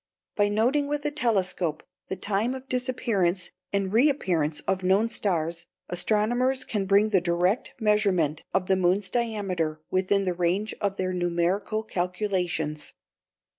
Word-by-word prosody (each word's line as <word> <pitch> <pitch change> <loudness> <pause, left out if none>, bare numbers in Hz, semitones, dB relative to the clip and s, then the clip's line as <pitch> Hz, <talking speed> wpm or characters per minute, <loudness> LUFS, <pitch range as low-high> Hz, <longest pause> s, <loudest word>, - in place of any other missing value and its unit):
By 205 -1 +3
noting 250 +8 +2
with 295 0 -2
a 295 - +1
telescope 190 - 0 0.2
the - - -3
time 215 +6 -1
of 265 0 -9
disappearance 225 -9 0 0.2
and 200 -1 -1
reappearance 185 - +2
of 190 -1 -1
known 195 +5 +3
stars, 170 -5 -1 0.2
astronomers 240 +8 +1
can 205 -6 -2
bring 200 +2 +4
the 195 -4 +3
direct 180 +5 0
measurement 200 -8 +2
of 190 -1 +1
the 190 - +3
moon's 185 +2 +1
diameter 195 -10 -1
within 190 +2 +2
the 185 -2 0
range 180 +5 0
of 200 -1 -1
their 185 0 -1
numerical 180 +5 0
calculations. 180 -6 -2
195 Hz, 135 wpm, -26 LUFS, 175-220 Hz, 0.2 s, bring